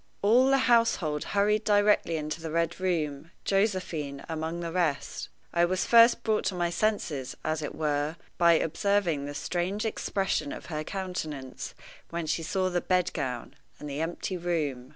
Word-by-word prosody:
All 245 Hz, +6 st, +5 dB
the 270 Hz, -, +5 dB
household 230 Hz, -11 st, +3 dB
hurried 210 Hz, +1 st, +2 dB
directly 205 Hz, -5 st, +3 dB
into 155 Hz, +1 st, -4 dB
the 160 Hz, -, -4 dB
Red 170 Hz, +2 st, 0 dB
Room, 160 Hz, -5 st, -1 dB, 0.2 s
Josephine 185 Hz, -9 st, -1 dB
among 160 Hz, +1 st, -3 dB
the 170 Hz, -1 st, -3 dB
rest. 165 Hz, -5 st, -1 dB, 0.2 s
I 170 Hz, -, +3 dB
was 185 Hz, +2 st, +1 dB
first 235 Hz, 0 st, +6 dB
brought 220 Hz, -1 st, +1 dB
to 185 Hz, -, 0 dB
my 175 Hz, -1 st, 0 dB
senses, 170 Hz, -10 st, -1 dB
as 155 Hz, 0 st, 0 dB
it 150 Hz, -, -5 dB
were, 150 Hz, 0 st, 0 dB, 0.2 s
by 170 Hz, -1 st, +6 dB
observing 165 Hz, -2 st, +1 dB
the 145 Hz, 0 st, -6 dB
strange 185 Hz, +7 st, -2 dB
expression 195 Hz, -8 st, -1 dB
of -, -, -7 dB
her 155 Hz, 0 st, -2 dB
countenance 155 Hz, -8 st, -5 dB, 0.3 s
when 170 Hz, -1 st, -3 dB
she 155 Hz, +1 st, -1 dB
saw 185 Hz, +3 st, 0 dB
the 175 Hz, 0 st, 0 dB
bed 180 Hz, -1 st, +1 dB
gown 125 Hz, -6 st, -4 dB, 0.2 s
and 150 Hz, -, -7 dB
the 145 Hz, +1 st, -3 dB
empty 175 Hz, +3 st, -3 dB
room. 150 Hz, -8 st, -2 dB
170 Hz, 165 wpm, -28 LUFS, 150-195 Hz, 0.3 s, first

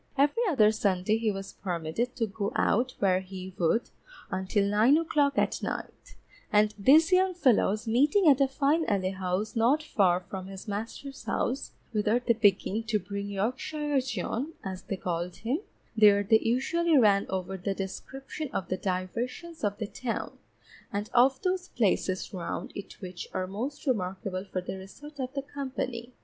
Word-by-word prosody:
Every 290 Hz, -, +3 dB
other 215 Hz, -10 st, +5 dB
Sunday 200 Hz, 0 st, +1 dB
he 225 Hz, -1 st, +1 dB
was 195 Hz, -1 st, -5 dB
permitted 180 Hz, +7 st, -3 dB
to 230 Hz, -, 0 dB
go 205 Hz, -1 st, -3 dB
out 250 Hz, +4 st, +1 dB
where 185 Hz, -2 st, +3 dB
he 190 Hz, 0 st, -8 dB
would, 180 Hz, +8 st, +1 dB, 0.4 s
until 190 Hz, +2 st, 0 dB
nine 215 Hz, +8 st, +5 dB
o'clock 295 Hz, -3 st, +1 dB
at -, -, +1 dB
night, -, -, -6 dB, 0.4 s
and 210 Hz, -1 st, +4 dB
these 310 Hz, -, +6 dB
young 370 Hz, 0 st, +4 dB
fellows 230 Hz, -, +2 dB
meeting 290 Hz, -, +4 dB
at 280 Hz, -2 st, +6 dB
a 275 Hz, -, +5 dB
fine 290 Hz, +4 st, +2 dB
alehouse 190 Hz, +1 st, -1 dB
not 250 Hz, +7 st, +3 dB
far 185 Hz, -10 st, +3 dB
from 185 Hz, +1 st, -7 dB
his 195 Hz, +2 st, -9 dB
master's 225 Hz, +7 st, -6 dB
house, 260 Hz, +3 st, -2 dB, 0.2 s
whither 215 Hz, +1 st, +2 dB
they 245 Hz, -1 st, +2 dB
began 210 Hz, -1 st, +2 dB
to 215 Hz, -1 st, +2 dB
bring 200 Hz, +1 st, -5 dB
Yorkshire 265 Hz, +8 st, -1 dB
John 250 Hz, -, -3 dB
(as 190 Hz, -1 st, -5 dB
they 195 Hz, -, -4 dB
called 175 Hz, 0 st, -3 dB
him), 250 Hz, +7 st, -2 dB, 0.4 s
there 205 Hz, -2 st, +6 dB
they 220 Hz, +2 st, +5 dB
usually 310 Hz, +8 st, +2 dB
ran 205 Hz, -5 st, +4 dB
over 190 Hz, 0 st, -3 dB
the 195 Hz, +1 st, -3 dB
description 265 Hz, +10 st, -6 dB
of 190 Hz, -, -3 dB
the 185 Hz, -, 0 dB
diversions 230 Hz, -, -4 dB
of 205 Hz, -1 st, 0 dB
the 215 Hz, -, -3 dB
town, 230 Hz, +3 st, -4 dB, 0.5 s
and 205 Hz, +1 st, -3 dB
of 260 Hz, +2 st, +5 dB
those 365 Hz, 0 st, 0 dB
places 200 Hz, -, 0 dB
round 180 Hz, -3 st, -4 dB
it 200 Hz, -, -9 dB
which 180 Hz, -2 st, -7 dB
are 185 Hz, -, 0 dB
most 235 Hz, +12 st, -5 dB
remarkable 190 Hz, -5 st, -2 dB
for 185 Hz, -2 st, -3 dB
the 185 Hz, +1 st, -5 dB
resort 290 Hz, +10 st, -12 dB
of 255 Hz, -1 st, -2 dB, 0.2 s
company. 260 Hz, -3 st, -4 dB
215 Hz, 160 wpm, -28 LUFS, 190-265 Hz, 0.5 s, these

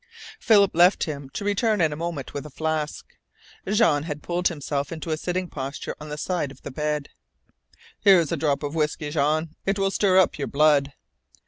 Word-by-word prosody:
Philip 200 Hz, -3 st, +5 dB
left 175 Hz, +3 st, +5 dB
him, 140 Hz, -3 st, -5 dB
to 200 Hz, -, -4 dB
return 210 Hz, +1 st, +1 dB
in 160 Hz, -3 st, +2 dB
a -, -, -5 dB
moment 165 Hz, -3 st, -5 dB
with 145 Hz, -, -4 dB
a -, -, -11 dB
flask. 155 Hz, +1 st, -3 dB, 0.7 s
Jean 205 Hz, -10 st, +3 dB
had 150 Hz, -1 st, -6 dB
pulled 175 Hz, +1 st, 0 dB
himself 145 Hz, -3 st, -3 dB
to 165 Hz, 0 st, -5 dB
a -, -, +2 dB
sitting 180 Hz, +3 st, -3 dB
posture 135 Hz, -3 st, -5 dB
on 150 Hz, -, -8 dB
the 150 Hz, -, -5 dB
side 175 Hz, -2 st, -2 dB
of 135 Hz, -, -15 dB
the -, -, -6 dB
bed. 150 Hz, +1 st, -2 dB, 0.9 s
"Here's 185 Hz, -6 st, +5 dB
a -, -, +1 dB
drop 145 Hz, -1 st, 0 dB
of 145 Hz, 0 st, -3 dB
whisky, 150 Hz, -1 st, -1 dB
Jean. 155 Hz, +2 st, +1 dB, 0.2 s
It 195 Hz, +1 st, +1 dB
will 195 Hz, -1 st, +1 dB
stir 195 Hz, -2 st, +3 dB
up 185 Hz, -5 st, +3 dB
your 140 Hz, -, -2 dB
blood." 145 Hz, -1 st, +3 dB
155 Hz, 195 wpm, -24 LUFS, 145-180 Hz, 0.9 s, Philip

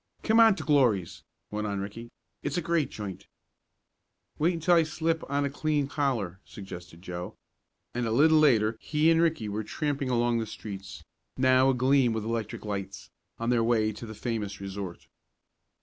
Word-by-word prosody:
"Come 225 Hz, +1 st, +4 dB
on 225 Hz, -3 st, +7 dB
to 160 Hz, -, -6 dB
Glory's," 100 Hz, -, +2 dB, 0.3 s
went 105 Hz, 0 st, -2 dB
on 100 Hz, -1 st, -2 dB
Ricky. 110 Hz, +4 st, -7 dB, 0.3 s
"It's -, -, -2 dB
a -, -, +1 dB
great 165 Hz, -3 st, +1 dB
joint." 100 Hz, -2 st, -7 dB, 1.1 s
"Wait 170 Hz, +3 st, +2 dB
until 165 Hz, +2 st, +2 dB
I 170 Hz, -, +6 dB
slip 160 Hz, +1 st, -1 dB
on 140 Hz, 0 st, +1 dB
a -, -, 0 dB
clean 145 Hz, -1 st, 0 dB
collar," 125 Hz, -, -1 dB
suggested 90 Hz, -3 st, -10 dB
Joe, 90 Hz, -1 st, -6 dB, 0.6 s
and 120 Hz, -1 st, -1 dB
a -, -, -1 dB
little 155 Hz, +6 st, +5 dB
later 115 Hz, -7 st, +4 dB
he 155 Hz, +1 st, +2 dB
and 165 Hz, 0 st, +4 dB
Ricky 160 Hz, -10 st, +1 dB
were 105 Hz, +1 st, -3 dB
tramping 140 Hz, +3 st, -2 dB
along 120 Hz, -1 st, +2 dB
the 110 Hz, -, -3 dB
streets, 100 Hz, -2 st, -8 dB, 0.3 s
now 130 Hz, 0 st, +4 dB
agleam 130 Hz, -1 st, +3 dB
with 110 Hz, -1 st, -2 dB
electric 115 Hz, -2 st, -3 dB
lights, 100 Hz, -2 st, -5 dB, 0.3 s
on 115 Hz, +1 st, -1 dB
their 120 Hz, -2 st, +3 dB
way 110 Hz, -2 st, +2 dB
to 110 Hz, +2 st, -9 dB
the 110 Hz, -, -8 dB
famous 105 Hz, -3 st, -3 dB
resort. 95 Hz, -2 st, -6 dB
120 Hz, 170 wpm, -28 LUFS, 105-150 Hz, 1.1 s, on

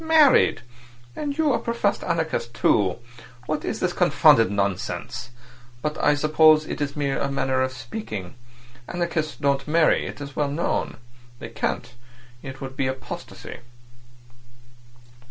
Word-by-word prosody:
"Married! 315 Hz, -4 st, +5 dB, 0.5 s
And 285 Hz, -1 st, -3 dB
you 310 Hz, -4 st, +3 dB
a -, -, +1 dB
professed 230 Hz, -3 st, -1 dB
anarchist, 160 Hz, -8 st, -2 dB
too! 95 Hz, -4 st, +2 dB, 0.5 s
What 155 Hz, 0 st, -2 dB
is -, -, -3 dB
this 180 Hz, -1 st, 0 dB
confounded 145 Hz, -, +5 dB
nonsense? 100 Hz, +4 st, -3 dB, 0.5 s
But 150 Hz, 0 st, -1 dB
I 145 Hz, -, +4 dB
suppose 155 Hz, +1 st, +5 dB
it's 145 Hz, -2 st, -3 dB
merely 140 Hz, -2 st, -1 dB
a 140 Hz, -, -1 dB
manner 135 Hz, -1 st, 0 dB
of 130 Hz, 0 st, 0 dB
speaking. 115 Hz, -, -7 dB, 0.5 s
Anarchists 170 Hz, -3 st, -2 dB
don't 140 Hz, 0 st, 0 dB
marry. 160 Hz, +1 st, +3 dB
It's 140 Hz, -1 st, -8 dB
well 145 Hz, -1 st, 0 dB
known. 155 Hz, +5 st, -2 dB, 0.4 s
They -, -, -8 dB
can't. -, -, -3 dB, 0.5 s
It 135 Hz, 0 st, -8 dB
would 135 Hz, 0 st, -6 dB
be 135 Hz, -, 0 dB
apostasy." 130 Hz, 0 st, -7 dB
145 Hz, 130 wpm, -24 LUFS, 130-165 Hz, 0.5 s, Married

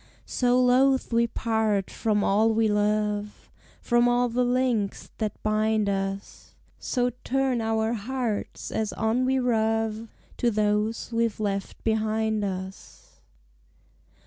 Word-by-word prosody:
So 250 Hz, 0 st, +2 dB
loath 255 Hz, 0 st, +3 dB
we 235 Hz, 0 st, +3 dB
part 220 Hz, -4 st, -1 dB
from 210 Hz, -2 st, 0 dB
all 220 Hz, +3 st, +3 dB
we 225 Hz, 0 st, +3 dB
love, 210 Hz, 0 st, -1 dB, 0.3 s
From 240 Hz, 0 st, +2 dB
all 245 Hz, 0 st, +2 dB
the 245 Hz, +2 st, +1 dB
links 245 Hz, -5 st, 0 dB
that 215 Hz, -2 st, -3 dB
bind 215 Hz, 0 st, +1 dB
us; 195 Hz, 0 st, -4 dB, 0.2 s
So 245 Hz, -1 st, 0 dB
turn 265 Hz, -2 st, 0 dB
our 220 Hz, 0 st, 0 dB
hearts, 235 Hz, -1 st, -3 dB
as 220 Hz, -1 st, -2 dB
on 230 Hz, +3 st, 0 dB
we 265 Hz, +1 st, +2 dB
rove, 225 Hz, -2 st, 0 dB, 0.3 s
To 240 Hz, -, +2 dB
those 210 Hz, +1 st, 0 dB
we've 230 Hz, -2 st, 0 dB
left 200 Hz, -2 st, -3 dB
behind 220 Hz, -1 st, 0 dB
us! 190 Hz, -1 st, -7 dB
220 Hz, 120 wpm, -26 LUFS, 210-240 Hz, 0.3 s, loath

